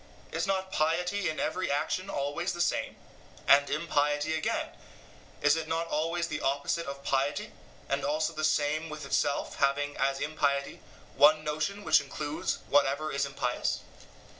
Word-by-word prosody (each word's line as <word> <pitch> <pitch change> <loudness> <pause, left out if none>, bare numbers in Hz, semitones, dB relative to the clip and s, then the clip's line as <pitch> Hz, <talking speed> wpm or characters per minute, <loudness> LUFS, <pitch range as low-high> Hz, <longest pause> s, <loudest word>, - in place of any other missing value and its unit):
Is - - -1
not 190 -1 -1
piety 180 +4 +1
in 155 - -4
every 185 0 -1
action 185 +6 -1
always 145 +6 -2
the 175 - -7
same? 175 - 0 0.5
and 140 0 +6
impiety, 150 0 +1
again 160 0 -1 0.7
is 150 +1 +5
it 160 -1 -3
not 165 +1 -1
always 165 +3 0
the - - -4
opposite 140 +5 0
of 140 0 -6
piety, 140 +1 0 0.4
and 140 +1 -1
also 155 +3 0
the 155 0 -4
same 155 +1 +1
with 150 -1 -7
itself, 140 0 0
having, 145 +1 +1
as 135 0 +1
impiety, 140 -2 -1 0.4
one 155 +1 +6
notion 155 +7 -2
which 155 -5 +5
includes 145 +2 -3
whatever 145 +2 +2
is 140 0 0
impious? 125 -3 -1
150 Hz, 150 wpm, -29 LUFS, 140-165 Hz, 0.7 s, and